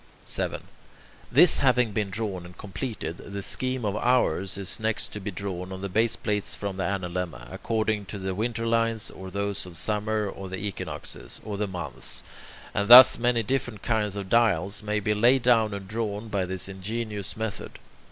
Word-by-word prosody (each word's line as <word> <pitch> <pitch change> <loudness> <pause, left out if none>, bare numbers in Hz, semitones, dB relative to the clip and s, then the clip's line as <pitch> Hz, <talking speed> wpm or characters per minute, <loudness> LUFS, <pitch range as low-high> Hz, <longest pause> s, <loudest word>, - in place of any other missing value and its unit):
7. - - -3 0.7
This 175 - +7
having 125 -4 +3
been 105 -1 -1
drawn 95 -3 -3
and 90 0 -13
completed, 100 -4 -5
the 100 0 -7
scheme 130 +1 0
of 100 -1 -1
hours 100 -7 +1
is 100 +3 -4
next 110 0 0
to 105 - -6
be 100 +1 -5
drawn 95 -2 -5
on 95 0 -6
the 100 - -4
baseplates 110 -1 0
from 100 -2 -5
the 95 - -1
analemma, 90 -8 -3
according 110 -2 -1
to 100 - -7
the 95 -1 -3
winter 115 +3 -2
lines, 115 -1 +1
or 95 0 -9
those 100 +1 -2
of 85 -2 -4
summer, 105 +2 0
or 95 -1 -7
the 95 - -4
equinoxes, 100 0 -5
or 105 - -4
the 105 +1 -1
months, 85 -9 -2 0.5
and 100 - 0
thus 125 +1 +10
many 120 -1 +2
different 120 -3 -2
kinds 105 -3 0
of 100 -2 -5
dials 100 -4 +2
may 105 0 -1
be 105 +1 0
laid 120 +4 +4
down 115 -3 +4
and 100 -1 -6
drawn 110 0 -3
by 100 -3 0
this 95 0 -1
ingenious 105 +2 -4
method. 110 -2 -5
105 Hz, 180 wpm, -26 LUFS, 95-115 Hz, 0.7 s, thus